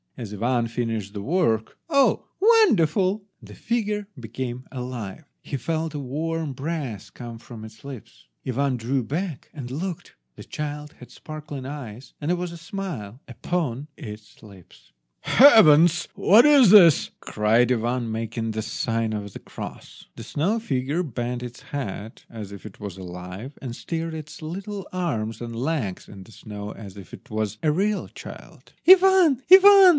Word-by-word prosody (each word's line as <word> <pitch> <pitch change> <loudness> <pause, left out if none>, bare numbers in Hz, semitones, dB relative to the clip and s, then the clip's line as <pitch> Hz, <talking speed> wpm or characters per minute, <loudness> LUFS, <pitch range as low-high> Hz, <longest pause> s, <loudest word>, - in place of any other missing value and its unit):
As 110 -4 -6
Ivan 120 +3 0
finished 115 -4 -3
the 100 - -5
work, 115 - 0
oh, 280 -3 +3
wonderful! 205 - +4 0.2
the - - -12
figure 210 -3 -2
became 125 +2 -6
alive! 125 -2 -6 0.2
He 140 - -4
felt 160 +4 -2
a 150 - -4
warm 155 +3 -3
breath 135 - -5
come 120 -2 -8
from 115 -2 -11
its 110 0 -12
lips. 135 -5 -11 0.2
Ivan 130 +1 0
drew 125 +3 -1
back, 160 - -4
and 130 -5 -7
looked. 170 +5 -5 0.2
The - - -10
child 150 0 -6
had 125 - -13
sparkling 150 -3 -8
eyes, 130 -4 -8
and 150 - -3
there 180 - +3
was 175 -1 -4
a 170 - -8
smile 165 - -6
upon 140 0 -3
its 105 +1 -11
lips. 95 - -16 0.3
"Heavens! 170 - +7
what 220 +7 +6
is 280 -9 +7
this?" 175 -8 +7
cried 115 +3 +2
Ivan, 120 0 0
making 115 0 -3
the 110 0 -3
sign 115 0 -2
of 100 -2 -5
the - - -8
cross. - - -10
The 115 - -8
snow 170 - 0
figure 145 - -1
bent 125 -4 -4
its 125 0 -8
head 115 -5 -6
as 105 -3 -8
if 100 0 -10
it 110 - -11
was 100 -3 -7
alive, 90 +7 -8
and 120 -3 -5
stirred 165 +2 -4
its 155 0 -9
little 195 +5 -6
arms 115 - -2
and 115 -1 -6
legs 125 - -2
in 95 -2 -11
the 105 - -17
snow 105 -1 -8
as 100 -3 -10
if 95 - -12
it - - -12
was 110 0 -2
a 155 - +3
real 200 +6 0
child. - - -12
"Ivan! 370 -7 +7
Ivan!" 390 0 +10
130 Hz, 160 wpm, -24 LUFS, 115-170 Hz, 0.3 s, Ivan